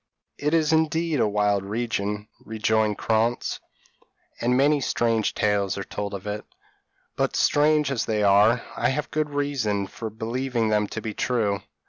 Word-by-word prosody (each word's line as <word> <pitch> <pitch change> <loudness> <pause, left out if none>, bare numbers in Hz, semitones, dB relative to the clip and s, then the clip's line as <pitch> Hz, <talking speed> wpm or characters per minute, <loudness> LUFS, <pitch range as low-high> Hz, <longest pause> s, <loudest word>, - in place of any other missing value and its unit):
p> 145 - -2
"It 155 - +3
is 160 -1 +2
indeed 160 -1 +1
a - - +3
wild 105 -1 +1
region," 105 -1 -3 0.2
rejoined 110 -1 0
Krantz, 115 +2 0 0.8
"and 125 +2 +2
many 145 +2 +3
strange 115 -4 0
tales 100 -2 +1
are 100 - -3
told 100 +1 -5
of 95 - -8
it; 105 0 -4 0.7
but - - 0
strange 150 -1 +3
as 130 - -1
they 105 -2 0
are, 105 +4 +4
I - - +1
have 145 +3 -2
good 155 -1 -1
reason 135 -9 -1
for 110 +3 -6
believing 115 +1 -2
them 105 -1 +2
to 110 - -6
be 110 - -4
true. 105 -6 0
110 Hz, 160 wpm, -25 LUFS, 105-140 Hz, 0.8 s, are